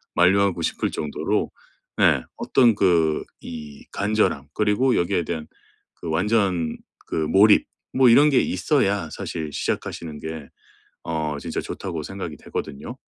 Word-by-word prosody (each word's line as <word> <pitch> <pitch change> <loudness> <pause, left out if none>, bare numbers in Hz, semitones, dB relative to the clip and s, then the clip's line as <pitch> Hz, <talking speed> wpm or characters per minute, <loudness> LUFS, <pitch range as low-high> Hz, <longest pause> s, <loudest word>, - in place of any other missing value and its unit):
만류하고 95 0 +3
싶을 - - -1
정도로 75 -2 -2 0.5
네. - - +4
'어떤 120 -4 +3
그 85 -6 +2 0.2
이 75 -3 -9
간절함 100 -9 0
그리고 110 +5 +2
여기에 85 0 +1
대한 80 -1 -5 0.5
그 85 - -7
완전 90 -2 +1 0.3
그 - - -4
몰입 95 +7 +4 0.3
뭐 130 -2 +6
이런 145 +6 +7
게 130 - +5
있어야 100 - 0
사실 80 -3 -5
시작하시는 80 -3 -4
게 80 -2 -7 0.6
어 80 -2 -2
진짜 - - -4
좋다.'고 85 -4 -5
생각이 90 -5 -6
되거든요. 70 - -6
85 Hz, 270 characters per minute, -23 LUFS, 80-105 Hz, 0.6 s, 이런